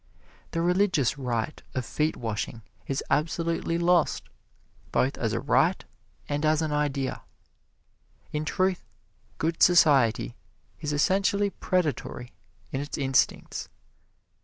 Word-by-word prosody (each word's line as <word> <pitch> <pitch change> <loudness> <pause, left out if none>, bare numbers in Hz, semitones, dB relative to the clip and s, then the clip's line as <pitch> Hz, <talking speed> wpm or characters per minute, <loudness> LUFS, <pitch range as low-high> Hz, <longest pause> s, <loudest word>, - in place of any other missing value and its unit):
The 165 - -1
religious 180 - +2
rite 125 +2 -2
of 130 -2 -1
feet 155 +6 -1
washing 110 0 -4 0.2
is 135 - -1
absolutely 165 +1 0
lost, 175 0 +2 0.7
both 135 +2 +1
as 115 -3 -1
a 115 - 0
rite - - +2 0.4
and 145 +1 -2
as 155 +1 +3
an 155 - -1
idea. 145 -3 -1 1.1
In 150 0 -1
truth, 185 +3 0 0.5
"good 165 +1 -1
society" 140 - +5 0.4
is 150 -2 -3
essentially 195 +6 +2
predatory 150 -9 -2 0.4
in 135 - -2
its 145 - -5
instincts. 135 -2 0
150 Hz, 110 wpm, -27 LUFS, 130-170 Hz, 1.1 s, society